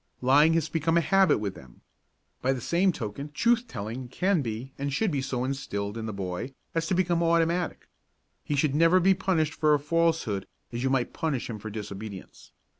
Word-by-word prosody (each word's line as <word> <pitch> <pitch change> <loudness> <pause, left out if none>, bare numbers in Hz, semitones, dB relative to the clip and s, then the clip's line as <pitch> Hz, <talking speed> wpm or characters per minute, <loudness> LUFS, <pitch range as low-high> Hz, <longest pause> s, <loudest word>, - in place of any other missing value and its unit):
Lying 145 +5 +5
has 165 -2 +1
become 165 +1 +1
a - - +6
habit 195 +4 +4
with 100 -2 -3
them. 65 -6 -15 0.6
By 130 +1 +2
the 130 - -4
same 175 +9 +2
token 140 +1 -6
truth 235 +7 +2
telling 115 - -5
can 180 +7 +1
be 120 +2 -5
and 140 0 -2
should 205 +7 +1
be 140 -3 0
so 130 -2 -2
instilled 105 -6 -3
in 115 -1 -4
the - - -3
boy 100 +6 -5 0.2
as 165 0 -1
to 185 - +1
become 175 -2 +1
automatic. 170 +1 +1 0.6
He 145 - -2
should 140 0 +2
never 165 +4 +5
be 190 +2 +5
punished 175 -5 0
for 150 -1 +3
a - - 0
falsehood 160 - 0 0.3
as 120 - -3
you 135 - +1
might 130 -2 0
punish 145 -8 -2
him 110 - -6
for 110 - -6
disobedience. 105 -1 -8
140 Hz, 195 wpm, -27 LUFS, 115-165 Hz, 0.6 s, a